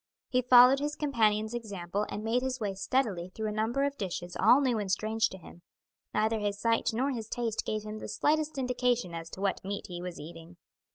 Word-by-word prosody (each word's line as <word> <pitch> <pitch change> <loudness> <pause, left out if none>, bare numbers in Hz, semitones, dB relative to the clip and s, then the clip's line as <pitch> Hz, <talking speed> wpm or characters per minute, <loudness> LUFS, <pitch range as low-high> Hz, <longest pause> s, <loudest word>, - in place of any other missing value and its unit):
He 255 0 +2
followed 250 +2 +7
his 295 +1 -2
companion's 220 -6 +1
example 205 -3 -3
and 210 - -5
made 230 +3 +1
his 260 0 -2
way 205 -3 -2
steadily 195 -3 -1
through 220 +4 -5
a - - -3
number 225 +6 0
of 280 0 -2
dishes 175 -2 -4
all 230 +6 +6
new 255 -5 +1
and 200 -2 -2
strange 220 +3 +1
to 190 - -9
him; 175 -1 -14 0.5
neither 220 +1 +1
his 205 -1 -2
sight 230 +1 +2
nor 260 +5 0
his 225 -4 -5
taste 230 -3 -2
gave 215 -1 -2
him 215 0 -6
the - - -7
slightest 310 0 0
indication 250 -6 0
as 165 0 -6
to 190 - -9
what 195 -1 -1
meat 200 +1 -4
he 175 -1 -6
was 180 -1 -6
eating. 165 +2 -11
220 Hz, 215 wpm, -30 LUFS, 195-250 Hz, 0.5 s, followed